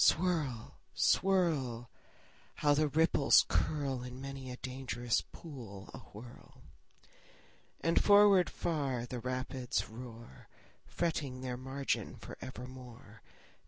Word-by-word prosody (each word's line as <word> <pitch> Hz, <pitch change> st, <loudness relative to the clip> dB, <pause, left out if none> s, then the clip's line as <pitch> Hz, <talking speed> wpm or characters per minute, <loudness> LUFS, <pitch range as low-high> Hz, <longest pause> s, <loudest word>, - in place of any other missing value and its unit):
Swirl, 155 Hz, -10 st, +1 dB, 0.2 s
swirl! 150 Hz, -12 st, +2 dB, 0.6 s
How 145 Hz, -1 st, +3 dB
the 155 Hz, +1 st, +3 dB
ripples 150 Hz, -1 st, +5 dB
curl 140 Hz, -4 st, 0 dB
In 125 Hz, +1 st, -7 dB
many 135 Hz, -1 st, -6 dB
a 125 Hz, -, -6 dB
dangerous 125 Hz, -2 st, -1 dB
pool 115 Hz, -, -9 dB
awhirl! 120 Hz, +4 st, -12 dB, 1.2 s
And 165 Hz, +1 st, +3 dB
forward 205 Hz, -3 st, +7 dB
far 140 Hz, -7 st, -1 dB
the 125 Hz, 0 st, -5 dB
rapids 130 Hz, 0 st, -2 dB
roar, 115 Hz, -, -10 dB, 0.4 s
Fretting 145 Hz, -6 st, -2 dB
their 125 Hz, -1 st, -3 dB
margin 135 Hz, +2 st, -2 dB
for -, -, -9 dB
evermore. 125 Hz, -4 st, -10 dB
130 Hz, 100 wpm, -33 LUFS, 125-150 Hz, 1.2 s, forward